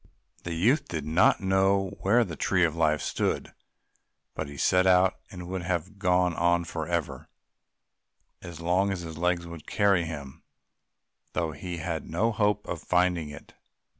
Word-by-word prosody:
The 85 Hz, -1 st, -4 dB
youth 115 Hz, -, +2 dB
did 80 Hz, -4 st, -4 dB
not 80 Hz, +7 st, +3 dB
know 95 Hz, 0 st, +2 dB
where 115 Hz, +5 st, +4 dB
the 85 Hz, -7 st, -6 dB
Tree 90 Hz, +2 st, +1 dB
of 80 Hz, -1 st, -2 dB
Life 80 Hz, -2 st, +1 dB
stood, -, -, -2 dB, 0.8 s
but 80 Hz, -, -4 dB
he 70 Hz, 0 st, -10 dB
set 90 Hz, +6 st, +3 dB
out, 95 Hz, 0 st, +4 dB
and 90 Hz, -4 st, -8 dB
would 95 Hz, 0 st, -3 dB
have 90 Hz, +3 st, -3 dB
gone 90 Hz, -2 st, +2 dB
on 85 Hz, +1 st, +2 dB
for 80 Hz, -1 st, -5 dB
ever, 85 Hz, -3 st, -3 dB, 1.1 s
as 85 Hz, -2 st, -9 dB
long 90 Hz, +4 st, +1 dB
as 95 Hz, -2 st, -3 dB
his 80 Hz, -2 st, -8 dB
legs 90 Hz, 0 st, 0 dB
would 85 Hz, -2 st, -10 dB
carry 100 Hz, -5 st, +2 dB
him, 70 Hz, -5 st, -8 dB, 0.9 s
though 85 Hz, -2 st, -1 dB
he 85 Hz, +4 st, -6 dB
had 80 Hz, -1 st, -4 dB
no 105 Hz, +8 st, +1 dB
hope 105 Hz, -1 st, +1 dB
of 85 Hz, -3 st, -4 dB
finding 90 Hz, -3 st, +1 dB
it. 75 Hz, -, -12 dB
90 Hz, 165 wpm, -27 LUFS, 80-95 Hz, 1.1 s, where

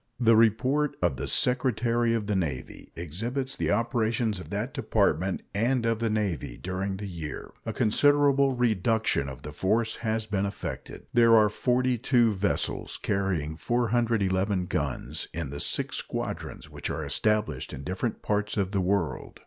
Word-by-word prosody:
The 115 Hz, -2 st, +5 dB
report 125 Hz, +7 st, +3 dB
of 85 Hz, -7 st, +1 dB
the -, -, -3 dB
Secretary 120 Hz, -2 st, +2 dB
of 110 Hz, -2 st, -2 dB
the 105 Hz, 0 st, -1 dB
Navy 70 Hz, -9 st, -4 dB
exhibits 115 Hz, -, -3 dB
the -, -, -1 dB
operations 115 Hz, -3 st, +1 dB
of -, -, -9 dB
that -, -, -3 dB
Department 90 Hz, +4 st, +1 dB
and 120 Hz, +4 st, +1 dB
of 115 Hz, -1 st, +1 dB
the 115 Hz, -1 st, 0 dB
Navy 100 Hz, -, -2 dB
during 95 Hz, +1 st, -3 dB
the 105 Hz, -, -6 dB
year. 80 Hz, -5 st, -6 dB, 0.2 s
A -, -, 0 dB
considerable 140 Hz, +4 st, +3 dB
reduction 110 Hz, -, +1 dB
of 65 Hz, 0 st, -10 dB
the 75 Hz, -, -6 dB
force 110 Hz, +8 st, 0 dB
has 110 Hz, -1 st, -1 dB
been 100 Hz, -2 st, 0 dB
effected. 100 Hz, -, -6 dB
There 115 Hz, -1 st, +6 dB
are 105 Hz, -1 st, +5 dB
42 125 Hz, 0 st, +2 dB
vessels, 100 Hz, +1 st, -1 dB
carrying 90 Hz, -6 st, -1 dB
411 105 Hz, -4 st, +1 dB
guns, 75 Hz, -7 st, -3 dB
in 85 Hz, -5 st, -3 dB
the 70 Hz, -, -5 dB
six -, -, -1 dB
squadrons -, -, -5 dB
which -, -, -6 dB
are -, -, -3 dB
established 105 Hz, -11 st, 0 dB
in 70 Hz, -, -7 dB
different 95 Hz, -, -3 dB
parts 105 Hz, 0 st, -1 dB
of 95 Hz, -2 st, 0 dB
the 100 Hz, -2 st, +1 dB
world. 95 Hz, -3 st, -1 dB
105 Hz, 155 wpm, -27 LUFS, 95-120 Hz, 0.2 s, There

